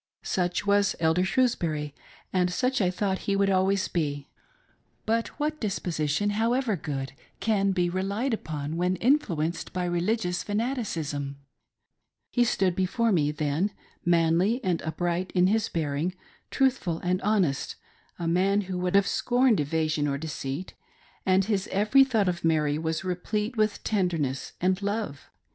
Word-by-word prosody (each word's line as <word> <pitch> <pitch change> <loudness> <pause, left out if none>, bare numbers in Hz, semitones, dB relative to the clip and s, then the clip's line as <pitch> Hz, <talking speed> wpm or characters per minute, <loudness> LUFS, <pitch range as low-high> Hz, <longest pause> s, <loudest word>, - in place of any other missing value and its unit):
Such 180 +1 -1
was 200 0 +3
Elder 160 +2 +3
Shrewsbury, 170 - 0 0.4
and 180 -1 +2
such 255 +5 0
I 185 - +3
thought 190 +1 -1
he 200 - +3
would 195 0 +2
always 190 +1 +2
be; 145 -4 -2 0.8
but 230 +1 +1
what 305 +1 -1
disposition, 180 -2 -1
however 230 +2 +1
good, 140 -4 -4 0.3
can 200 -3 +2
be 180 -2 +1
relied 200 +8 -1
upon 155 -5 -4
when 180 +1 +1
influenced 180 - 0
by 180 -1 -1
religious 180 +1 0
fanaticism 205 - -2
.■' 140 0 -6 1.0
He 245 - +3
stood 190 -6 +1
before 220 +5 +1
me, 155 -6 +2
then, 150 +5 0 0.3
manly 170 +6 +3
and 180 -4 0
upright 175 +3 -2
in 180 0 +5
his. 215 +3 +2
bearing, 160 +2 -1 0.3
truthful 255 - +1
and 180 +1 0
honest, 190 -9 +1 0.4
a 170 - -3
man 190 +4 +2
who 185 -2 -4
would 180 +1 0
have 200 0 +5
scorned 245 -1 +2
evasion 155 0 0
or 140 -1 -1
deceit, 150 +2 -5 0.5
and 190 0 +4
his 200 -3 0
every 210 +8 +4
thought 225 -7 +1
of 175 -1 -1
Mary 155 -2 +2
was 160 +2 -2
replete 210 +5 -2
with 215 -1 0
tenderness 165 -10 -1
and 185 +2 +1
love. 200 -8 -3
185 Hz, 145 wpm, -27 LUFS, 160-210 Hz, 1.0 s, in